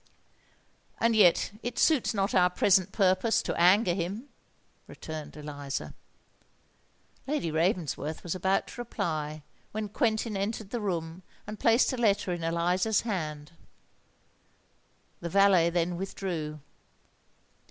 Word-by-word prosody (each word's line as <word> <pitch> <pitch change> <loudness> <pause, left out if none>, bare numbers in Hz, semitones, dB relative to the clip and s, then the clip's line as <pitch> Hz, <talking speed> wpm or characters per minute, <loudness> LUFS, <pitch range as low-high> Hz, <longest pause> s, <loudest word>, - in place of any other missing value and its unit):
"And 230 0 +2
yet 190 -4 +4
it 245 - -5
suits 310 -7 +3
not 200 -2 -1
our 180 -1 +5
present 190 +1 +3
purpose 190 +2 +2
to - - -2
anger 180 +2 +4
him," 195 +9 -4 0.6
returned 155 -1 -8
Eliza. 145 -2 -5 1.3
Lady 275 - -1
Ravensworth 160 -2 -1
was 175 - -3
about 190 +1 +1
to 245 - -7
reply, 155 -9 -3 0.3
when 215 -1 -3
Quentin 220 -1 0
entered 200 +1 -3
the 240 - -3
room 170 -3 -3 0.2
and 210 0 -8
placed 230 +3 +3
a - - -3
letter 205 -5 +1
in 170 -1 -5
Eliza's 175 +6 +1
hands. 155 -9 -4 1.7
The 170 - -5
valet 195 -2 +5
then 175 0 -1
withdrew. 170 -5 -4
185 Hz, 120 wpm, -28 LUFS, 165-210 Hz, 1.7 s, our